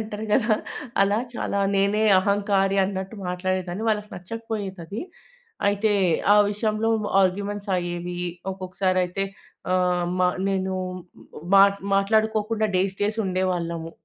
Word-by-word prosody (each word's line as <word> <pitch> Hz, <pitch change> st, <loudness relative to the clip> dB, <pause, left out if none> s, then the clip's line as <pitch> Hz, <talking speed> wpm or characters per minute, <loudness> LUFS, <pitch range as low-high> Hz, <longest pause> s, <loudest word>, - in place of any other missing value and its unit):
పొగరంటారు 215 Hz, +1 st, -5 dB
కదా! 220 Hz, -3 st, +3 dB, 0.5 s
అలా 200 Hz, +2 st, +2 dB, 0.2 s
చాలా 200 Hz, -, -2 dB, 0.2 s
నేనే 200 Hz, +2 st, +2 dB, 0.2 s
అహంకారి 200 Hz, 0 st, +1 dB
అన్నట్టు 190 Hz, +2 st, -4 dB
మాట్లాడేదాన్ని. 185 Hz, +1 st, -2 dB
వాళ్ళకి 210 Hz, -1 st, -1 dB
నచ్చకపోయేదది. 200 Hz, -1 st, -6 dB, 0.7 s
అయితే 205 Hz, +1 st, +1 dB, 0.4 s
ఆ -, -, +6 dB
విషయంలో 215 Hz, +1 st, 0 dB, 0.3 s
ఆర్గ్యుమెంట్స్ 200 Hz, +2 st, -1 dB
అయ్యేవి. 175 Hz, 0 st, -4 dB, 0.3 s
ఒక్కొక్కసారయితే 185 Hz, 0 st, -1 dB, 0.5 s
ఆహ్, 180 Hz, -1 st, +2 dB
మ -, -, 0 dB, 0.3 s
నేను 190 Hz, -1 st, -1 dB, 0.8 s
మా 195 Hz, -, +9 dB, 0.3 s
మాట్లాడుకోకుండా 215 Hz, +2 st, +1 dB
డేస్ 190 Hz, +1 st, 0 dB
డేస్ 215 Hz, +2 st, 0 dB
ఉండేవాళ్ళము. 175 Hz, -3 st, -2 dB
195 Hz, 105 wpm, -24 LUFS, 185-210 Hz, 0.8 s, మా